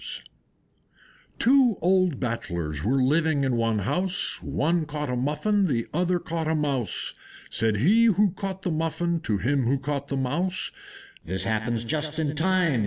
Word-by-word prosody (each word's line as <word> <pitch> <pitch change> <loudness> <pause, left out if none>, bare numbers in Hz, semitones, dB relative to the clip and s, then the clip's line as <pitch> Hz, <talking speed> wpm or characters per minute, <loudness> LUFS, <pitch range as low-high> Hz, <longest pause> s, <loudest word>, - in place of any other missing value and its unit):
Two 250 -4 +4
old 185 -4 +2
Bachelors 85 - -3
were 125 +7 +1
living 145 +2 +2
in 130 -2 +1
one 115 -2 +1
house; 175 - 0
One 160 +1 0
caught 150 -3 -3
a - - -1
Muffin, 150 +10 +1
the 120 -7 0
other 180 +2 +1
caught 165 -2 -3
a 160 - +1
Mouse. 140 - 0 0.4
Said 110 -1 +1
he 205 - +4
who 210 -2 +4
caught 190 0 -5
the 180 - -1
Muffin 165 +2 -1
to 105 -9 -1
him 130 +4 0
who 135 +3 +2
caught 140 +1 -3
the 140 - -2
Mouse, 170 +8 -1 0.5
"This 95 +2 -3
happens 110 +2 -1
just 150 +4 -2
in 155 -2 -1
time! 170 -4 +2
150 Hz, 160 wpm, -25 LUFS, 125-175 Hz, 0.5 s, Two